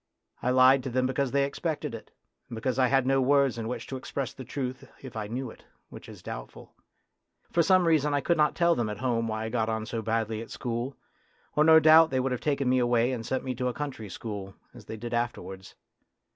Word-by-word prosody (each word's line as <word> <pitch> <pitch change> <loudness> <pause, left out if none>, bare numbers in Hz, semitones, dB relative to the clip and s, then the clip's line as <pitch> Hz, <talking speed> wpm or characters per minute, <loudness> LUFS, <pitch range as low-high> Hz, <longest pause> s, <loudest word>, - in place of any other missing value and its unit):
I 125 - 0
lied 130 +1 +6
to 130 - -5
them 130 +1 0
because 135 +1 0
they 140 +2 +2
expected 150 -1 -3
it, 115 - -9 0.4
and 115 - -6
because 125 +3 -2
I 130 - +5
had 135 0 +2
no 135 0 +3
words 135 -2 +3
in 110 - -4
which 125 - -4
to 135 - -5
express 135 0 -4
the 130 - -9
truth 130 0 -5
if 130 -4 -9
I 105 -2 -4
knew 125 +2 -4
it, - - -17 0.3
which - - -11
is - - -12
doubtful. - - -9 0.8
For 170 - +3
some 185 +2 +4
reason 155 -3 +3
I 145 - +2
could 170 +4 +1
not 150 -1 +2
tell 170 -1 +3
them 120 -7 -1
at 105 - -5
home 115 -1 0
why 110 0 -3
I - - -3
got 115 -1 -1
on 110 -1 -2
so 115 0 -4
badly 110 0 -1
at 115 - -9
school, 120 +2 -4 0.6
or 150 - +4
no 160 0 +8
doubt 160 +1 +7
they 130 - 0
would 130 +1 -1
have 125 - -2
taken 140 -3 0
me 130 0 +3
away 120 0 +2
and 120 -3 -4
sent 130 +3 -2
me 130 - -3
to 125 +1 -2
a 125 - -2
country 135 -8 -5
school, 105 -7 -7 0.2
as 120 -4 -13
they 110 - -7
did 120 +2 -6
afterwards. 105 -5 -4
125 Hz, 240 wpm, -28 LUFS, 115-140 Hz, 0.8 s, no